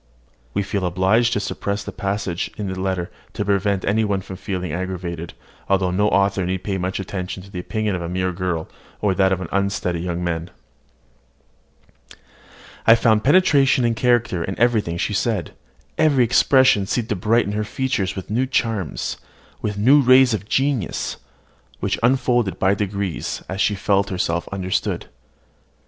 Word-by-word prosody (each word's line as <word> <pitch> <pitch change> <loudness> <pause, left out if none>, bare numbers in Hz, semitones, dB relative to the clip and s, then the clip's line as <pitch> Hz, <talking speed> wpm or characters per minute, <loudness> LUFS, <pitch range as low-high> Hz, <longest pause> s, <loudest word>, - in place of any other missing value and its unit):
(We 100 - +1
feel 100 0 -2
obliged 95 +7 +2
to 105 - +1
suppress 100 0 -3
the - - -6
passage 100 -3 -3
in 105 - -3
the 95 - -6
letter, 95 -2 -2 0.2
to 105 - -3
prevent 100 -1 +1
any 110 +3 +2
one 100 -2 0
from 95 - -8
feeling 90 -4 -4
aggrieved; 90 -2 -4 0.3
although 95 -2 +2
no 100 +3 +2
author 100 -1 +2
need 95 +1 -2
pay 95 -1 -2
much 90 +2 -2
attention 95 -1 -5
to 100 - -15
the 90 - -5
opinion 110 +3 -2
of 90 - -3
a 85 - -4
mere 90 +1 -1
girl, 90 -3 -3 0.3
or 100 -2 +1
that 95 0 +3
of 95 -1 0
an - - -4
unsteady 100 -3 -1
young 90 0 -3
man.) 85 0 -2 2.4
I 115 - +9
found 110 -2 +3
penetration 140 -5 +4
and 115 -1 +1
character 120 -7 +1
in 95 +3 -4
everything 110 -8 +1
she 105 - -1
said: 105 -3 -1 0.5
every 145 -5 +4
expression 125 -3 +4
seemed 115 +1 -1
to 105 - 0
brighten 105 +3 +1
her 105 +1 -1
features 105 -4 -2
with 95 +1 -7
new 125 +4 +1
charms, 110 - -1 0.4
with 105 -1 -3
new 135 +8 +5
rays 130 -1 +6
of 105 0 -4
genius, 135 -7 0 0.6
which - - -1
unfolded 120 -4 +2
by 95 +1 +3
degrees, 100 -3 -3
as 95 +2 -3
she 105 - +2
felt 100 +1 +1
herself 85 -2 -1
understood. 95 -1 -2
100 Hz, 165 wpm, -21 LUFS, 95-115 Hz, 2.4 s, I